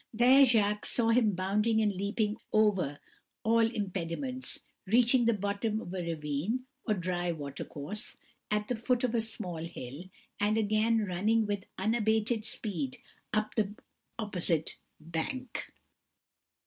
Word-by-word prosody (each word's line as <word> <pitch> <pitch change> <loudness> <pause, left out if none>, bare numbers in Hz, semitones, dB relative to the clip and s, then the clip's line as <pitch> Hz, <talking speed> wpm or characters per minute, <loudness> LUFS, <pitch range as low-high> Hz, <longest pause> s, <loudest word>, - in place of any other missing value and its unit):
There 255 +4 +7
Jacques 210 -4 +2
saw 230 -2 +2
him 225 -4 +4
bounding 210 +5 +2
and 215 -1 +3
leaping 205 +2 -1
over 195 -10 +2 0.4
all 230 0 +4
impediments, 220 +3 -1 0.3
reaching 240 +3 +5
the 235 - +4
bottom 205 +2 -1
of 180 -4 -7
a 185 - -2
ravine, 165 - -2 0.2
or 215 - +3
dry 175 -1 -1
watercourse, 145 +5 -5 0.3
at 210 0 0
the 250 - 0
foot 245 +2 0
of 245 -2 +1
a 230 - +3
small 185 -6 -4
hill, 160 -1 -7 0.3
and 210 +1 +2
again 220 +1 +2
running 210 +5 +2
with 205 -1 -2
unabated 220 +1 +1
speed 175 - -1 0.3
up 215 0 0
the 210 -2 0 0.4
opposite 180 -7 -1 0.2
bank. 170 - -4
210 Hz, 130 wpm, -31 LUFS, 180-225 Hz, 0.4 s, There